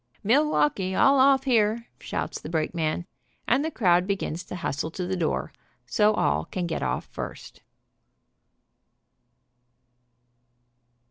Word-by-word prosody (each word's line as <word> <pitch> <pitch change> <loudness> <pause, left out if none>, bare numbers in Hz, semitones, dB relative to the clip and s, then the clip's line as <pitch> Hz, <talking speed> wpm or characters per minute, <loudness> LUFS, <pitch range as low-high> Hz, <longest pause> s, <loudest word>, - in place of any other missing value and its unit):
"Milwaukee, 195 - +2
all 275 +5 +5
off 270 0 +5
here," 230 -3 +2
shouts - - -4
the - - -7
brakeman, 160 0 -1 0.4
and 265 +5 +3
the 320 - -1
crowd 180 - +2
begins 185 -4 -2
to - - -7
hustle 160 -3 -3
to 180 +2 -5
the 190 +1 -2
door, 170 -4 -2 0.3
so 210 0 +3
all 75 - +1
can 180 - -3
get 170 - -3
off - - -2
first. - - -8
185 Hz, 120 wpm, -26 LUFS, 170-235 Hz, 0.4 s, all